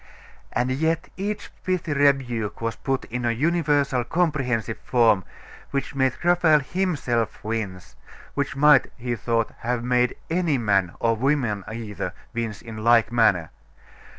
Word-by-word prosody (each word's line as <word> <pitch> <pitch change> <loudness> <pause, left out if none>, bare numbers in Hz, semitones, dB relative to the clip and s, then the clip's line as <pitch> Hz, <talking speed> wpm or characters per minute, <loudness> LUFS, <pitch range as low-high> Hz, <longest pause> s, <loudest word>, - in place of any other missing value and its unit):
And 125 +1 0
yet 160 +4 0
each 205 +2 -4
pithy 185 -4 -1
rebuke 130 -7 +1
was 115 -1 -2
put 135 -1 -2
in 120 +1 -4
a 120 - +1
universal, 145 -1 +1
comprehensive 125 -8 -1
form, 115 -6 +3 0.5
which 140 0 -3
made 130 -2 +2
Raphael 170 -3 +4
himself 140 - -1
wince 100 -5 -4 0.4
which 140 -1 -2
might, 145 -1 +6
he 120 -1 -2
thought, 115 0 -1
have 120 0 -2
made 125 0 +2
any 165 -4 +1
man, 100 -6 +1
or 115 0 +2
woman 120 -5 0
either, 105 -5 -5 0.2
wince 115 -3 -4
in 115 -2 -8
like 115 +1 +4
manner. 105 -9 +3
125 Hz, 135 wpm, -24 LUFS, 115-145 Hz, 0.5 s, might